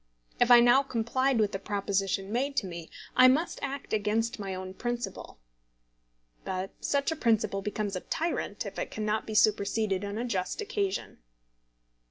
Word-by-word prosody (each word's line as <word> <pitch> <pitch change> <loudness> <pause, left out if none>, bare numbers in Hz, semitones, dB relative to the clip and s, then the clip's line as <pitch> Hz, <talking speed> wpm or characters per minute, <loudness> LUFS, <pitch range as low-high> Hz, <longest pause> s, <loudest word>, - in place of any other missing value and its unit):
If 245 - +4
I 240 -1 +9
now 245 +3 +6
complied 260 +1 0
with 210 -2 +2
the 195 - -3
proposition 195 -1 -1
made 275 +4 -1
to 205 - +2
me, 170 -3 -7 0.3
I 255 - +8
must 295 +7 +2
act 275 -3 -5
against 220 +2 0
my 195 -2 -4
own 185 0 -6
principle. 240 +3 -5 1.1
But 185 +1 -3
such 280 +3 0
a - - -1
principle 220 -7 +1
becomes 205 0 -3
a - - -1
tyrant 335 +2 -2
if - - -6
it - - -3
cannot 215 0 -2
be 215 - -4
superseded 205 -2 +2
on 205 +1 -4
a 235 - -2
just 185 -6 -2
occasion. 405 -2 -2
220 Hz, 165 wpm, -29 LUFS, 195-255 Hz, 1.1 s, I